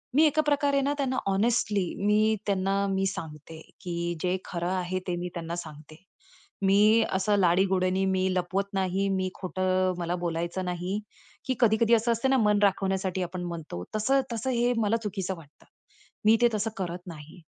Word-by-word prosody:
मी 310 Hz, -, +6 dB
एका 310 Hz, 0 st, +3 dB
प्रकारे 285 Hz, -1 st, +2 dB
ना 280 Hz, +1 st, +1 dB
त्यांना 260 Hz, -2 st, -1 dB
हॉनेस्टली 205 Hz, -1 st, +1 dB, 0.2 s
मी 215 Hz, +1 st, +3 dB
त्यांना 195 Hz, -1 st, 0 dB
मी 195 Hz, 0 st, 0 dB
सांगते 160 Hz, -1 st, -7 dB, 0.2 s
की 175 Hz, -, -5 dB, 0.3 s
जे 185 Hz, +1 st, 0 dB
खरं 175 Hz, 0 st, -3 dB
आहे 185 Hz, 0 st, -1 dB
ते 180 Hz, -, -1 dB
मी 175 Hz, +1 st, -4 dB
त्यांना 170 Hz, -1 st, -4 dB
सांगते. 155 Hz, -2 st, -9 dB, 0.7 s
मी 210 Hz, +4 st, +5 dB
असं 200 Hz, +2 st, +2 dB
लाडीगोडीनी 185 Hz, +1 st, +2 dB
मी 190 Hz, 0 st, +1 dB
लपवत 185 Hz, +2 st, 0 dB
नाही, 190 Hz, +1 st, 0 dB
मी 185 Hz, -1 st, 0 dB
खोटं 185 Hz, 0 st, 0 dB
मला 175 Hz, +1 st, -1 dB
बोलायचं 170 Hz, +1 st, -3 dB
नाही 180 Hz, +3 st, -2 dB, 0.5 s
की, 260 Hz, -, 0 dB
कधी-कधी 230 Hz, 0 st, +4 dB
असं 230 Hz, +1 st, +3 dB
असतं 230 Hz, +3 st, 0 dB
ना, 265 Hz, -, +4 dB
मन 210 Hz, -3 st, +3 dB
राखवण्यासाठी 190 Hz, -1 st, +1 dB
आपण 180 Hz, +1 st, -5 dB
म्हणतो, 165 Hz, -, -6 dB
तसं-तसं 260 Hz, +1 st, 0 dB
हे 240 Hz, 0 st, +2 dB
मला 225 Hz, 0 st, +2 dB
चुकीचं 195 Hz, -2 st, -3 dB
वाटतं. 155 Hz, -2 st, -17 dB, 0.6 s
मी 220 Hz, +1 st, +6 dB
ते 240 Hz, -, +7 dB
तसं 215 Hz, +1 st, 0 dB
करत 180 Hz, -1 st, -5 dB
नाही. 160 Hz, +1 st, -11 dB
190 Hz, 165 wpm, -27 LUFS, 180-215 Hz, 0.7 s, ते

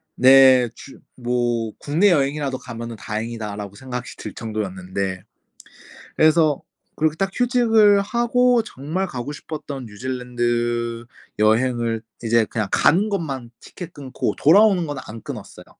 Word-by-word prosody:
네. 130 Hz, -1 st, +7 dB
주 135 Hz, -, -13 dB, 0.2 s
뭐 120 Hz, -2 st, -1 dB
'국내 165 Hz, +8 st, +2 dB
여행이라도 140 Hz, -3 st, 0 dB
가면은 115 Hz, -1 st, -7 dB
다행이다,'라고 105 Hz, -2 st, -5 dB
생각이 125 Hz, -1 st, -6 dB
들 -, -, -7 dB
정도였는데, 95 Hz, -3 st, -4 dB, 0.9 s
그래서 155 Hz, -2 st, +3 dB, 0.3 s
그렇게 155 Hz, 0 st, +1 dB
딱 195 Hz, +3 st, -1 dB
휴직을 225 Hz, -4 st, +4 dB
하고 240 Hz, +2 st, +2 dB
정말 165 Hz, +2 st, -4 dB
가고 130 Hz, -3 st, -5 dB
싶었던 145 Hz, -3 st, -7 dB
뉴질랜드 120 Hz, 0 st, -2 dB, 0.4 s
여행을 115 Hz, +1 st, +2 dB, 0.2 s
이제 115 Hz, 0 st, +3 dB
그냥 105 Hz, -1 st, -3 dB
가는 195 Hz, +7 st, +3 dB
것만 140 Hz, -, -3 dB
티켓 180 Hz, -2 st, -10 dB
끊고 135 Hz, -3 st, -3 dB
돌아오는 190 Hz, +2 st, +5 dB
거는 145 Hz, -2 st, -5 dB
안 115 Hz, +1 st, -9 dB
끊었어요. -, -, -9 dB
130 Hz, 290 characters per minute, -22 LUFS, 115-160 Hz, 0.9 s, 네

